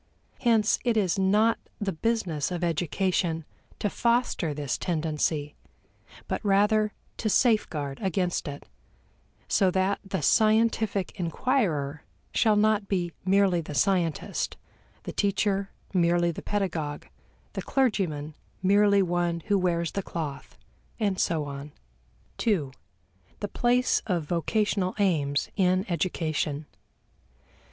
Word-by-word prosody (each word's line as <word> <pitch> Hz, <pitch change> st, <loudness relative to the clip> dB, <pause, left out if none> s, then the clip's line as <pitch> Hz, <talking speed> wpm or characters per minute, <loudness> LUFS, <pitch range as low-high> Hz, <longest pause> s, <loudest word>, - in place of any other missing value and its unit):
Hence 225 Hz, -3 st, +3 dB
it 240 Hz, -3 st, +1 dB
is 190 Hz, -3 st, +1 dB
not 210 Hz, +4 st, +3 dB, 0.2 s
the 205 Hz, -2 st, -1 dB
business 180 Hz, -5 st, -1 dB
of 180 Hz, -1 st, -3 dB
education 170 Hz, 0 st, 0 dB, 0.3 s
to -, -, -1 dB
foster 235 Hz, -6 st, +1 dB
this 145 Hz, -3 st, -2 dB
tendency, 155 Hz, -3 st, -1 dB, 0.7 s
but -, -, -3 dB
rather 210 Hz, +1 st, +3 dB, 0.3 s
to 220 Hz, -, -1 dB
safeguard 160 Hz, -, +1 dB
against 180 Hz, -2 st, -1 dB
it, 145 Hz, 0 st, -7 dB, 0.8 s
so 195 Hz, -3 st, +3 dB
that 190 Hz, +2 st, +1 dB
the 195 Hz, -5 st, -3 dB
scientific 220 Hz, 0 st, +3 dB
inquirer 165 Hz, -, 0 dB, 0.3 s
shall 220 Hz, -2 st, +4 dB
not 210 Hz, -1 st, +2 dB
be 180 Hz, -4 st, -1 dB
merely 190 Hz, -2 st, +3 dB
the 150 Hz, -2 st, -7 dB
scientist, 175 Hz, -2 st, 0 dB, 0.5 s
the -, -, -6 dB
teacher 200 Hz, -1 st, 0 dB, 0.2 s
merely 175 Hz, -1 st, +3 dB
the -, -, -7 dB
pedagogue, 165 Hz, -8 st, -2 dB, 0.5 s
the -, -, -3 dB
clergyman 180 Hz, -, 0 dB, 0.3 s
merely 200 Hz, +1 st, +5 dB
one 175 Hz, -1 st, 0 dB
who 200 Hz, +2 st, +1 dB
wears 170 Hz, -2 st, 0 dB
the 200 Hz, -, -2 dB
cloth, 155 Hz, -6 st, -6 dB, 0.4 s
and 200 Hz, -4 st, 0 dB
so 160 Hz, -3 st, +1 dB
on. 140 Hz, +1 st, -7 dB, 0.7 s
2. 175 Hz, -, +1 dB, 0.7 s
The 205 Hz, -, -2 dB
Place 245 Hz, +4 st, +2 dB
of 175 Hz, -5 st, 0 dB
Vocational 185 Hz, +4 st, 0 dB
Aims 150 Hz, -8 st, +1 dB
in 185 Hz, 0 st, +2 dB
Education. 155 Hz, -4 st, -1 dB
185 Hz, 115 wpm, -27 LUFS, 160-210 Hz, 0.8 s, merely